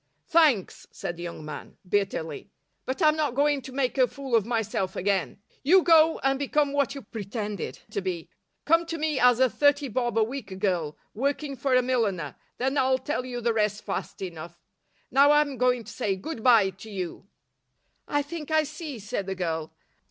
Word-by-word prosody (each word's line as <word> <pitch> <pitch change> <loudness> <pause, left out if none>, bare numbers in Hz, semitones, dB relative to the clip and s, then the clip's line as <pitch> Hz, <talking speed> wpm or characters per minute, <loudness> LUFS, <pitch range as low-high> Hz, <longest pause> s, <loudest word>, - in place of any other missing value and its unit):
"Thanks," 305 - +2
said 175 - -5
the 170 - -10
young 170 -3 -6
man, 150 -1 -8
bitterly, 190 -4 -2 0.4
"but 265 +7 -1
I'm 305 0 +5
not 295 -5 -1
going 290 0 +2
to 265 - -9
make 265 0 -1
a 255 - +6
fool 275 -2 -8
of 225 -2 +3
myself 220 -5 -1
again. 195 +1 -1 0.2
You 360 +6 +5
go 325 -1 +6
and 270 0 +2
become 285 0 +1
what 280 -1 +1
you 275 - -7
pretended 210 -1 -5
to 200 - -2
be. 180 -3 -4 0.4
Come 330 +2 +3
to 330 - -3
me 305 -3 0
as 245 -1 +5
a 260 - +6
thirty 285 +2 +2
bob 240 0 -1
a 225 - +5
week 220 -5 -5
girl, 175 -6 -1 0.2
working 280 +4 -2
for 260 +1 +1
a 255 - +4
milliner, 210 - -1 0.2
then 265 +3 0
I'll 260 0 +3
tell 260 -1 -3
you 245 -1 -4
the 235 0 +1
rest 210 -1 0
fast 195 -1 -4
enough. 170 -1 -8 0.5
Now 275 +3 +6
I'm 295 -2 +3
going 250 -1 +2
to 225 - -10
say 205 -6 -1
'Good 225 +4 -6
bye' 225 -6 +5
to 200 +4 -12
you." 190 -1 -6 0.8
"I 290 0 +1
think 305 +1 -7
I 315 0 +3
see," 305 -2 -7
said 205 -2 -4
the 190 - -2
girl. 160 -3 -3
245 Hz, 190 wpm, -26 LUFS, 195-285 Hz, 0.8 s, a